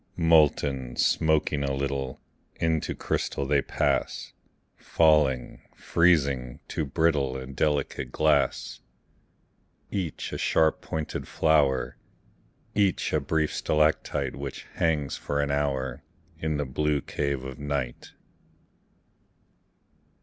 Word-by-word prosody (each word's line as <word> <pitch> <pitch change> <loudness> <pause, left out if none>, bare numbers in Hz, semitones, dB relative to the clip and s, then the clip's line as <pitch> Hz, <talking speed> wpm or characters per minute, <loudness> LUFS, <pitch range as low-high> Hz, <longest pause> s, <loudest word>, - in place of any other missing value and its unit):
Molten, 75 -6 +3
smoking 75 -1 +2
a 70 -1 -1
little, 70 -1 -3 0.4
Into 80 -2 0
crystal 70 - -2
they 70 0 +2
pass; - - -1 0.4
Falling, 75 -6 +2
freezing, 70 -8 +2
to 80 - -2
brittle 70 -3 +1
And 65 0 -8
delicate 75 0 -1
glass. 75 -2 +1 1.1
Each 90 -7 -3
a - - -3
sharp 80 -1 +2
pointed 80 -1 -4
flower, 70 -5 +2 0.8
Each 100 -3 +1
a 75 - +3
brief 75 +2 0
stalactite 75 0 +1
Which 70 -1 -6
hangs 75 -4 0
for 70 - -2
an 70 0 0
hour 70 -2 -1 0.4
In 80 -1 -1
the 75 - -1
blue 75 +2 0
cave 70 -2 -2
of 65 0 -7
night. 70 -4 -4
70 Hz, 105 wpm, -27 LUFS, 70-80 Hz, 1.1 s, Molten